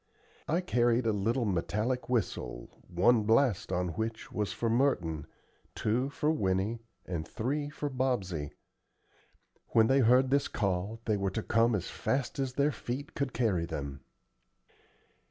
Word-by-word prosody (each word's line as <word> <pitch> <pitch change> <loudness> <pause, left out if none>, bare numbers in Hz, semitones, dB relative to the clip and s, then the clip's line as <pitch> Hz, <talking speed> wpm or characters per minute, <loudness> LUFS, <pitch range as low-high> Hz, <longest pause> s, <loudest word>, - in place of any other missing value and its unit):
I 170 +4 +1
carried 120 -7 +2
a 110 - +2
little 115 +5 0
metallic 105 +7 -1
whistle 65 - -2 0.2
one 105 +7 +4
blast 115 0 +2
on 90 0 0
which 110 +6 -4
was 105 -1 -1
for 115 - -2
Merton, 100 - +1 0.5
two 125 +5 0
for 150 +2 0
Winnie, 100 -3 0 0.3
and 80 -4 -4
three 145 +6 -2
for 150 0 -4
Bobsey. 115 - -1 1.2
When 110 - +6
they 135 +4 +4
heard 130 +2 +5
this 140 0 +3
call 100 +2 -2
they 105 -2 +1
were 100 0 0
to 105 +4 -3
come 115 +1 +3
as 95 -3 -3
fast 135 +1 -2
as 135 -2 -1
their 140 +3 +2
feet 130 +1 -5
could 140 -2 -2
carry 95 -10 0
them. 70 -4 -5
115 Hz, 145 wpm, -31 LUFS, 95-130 Hz, 1.2 s, When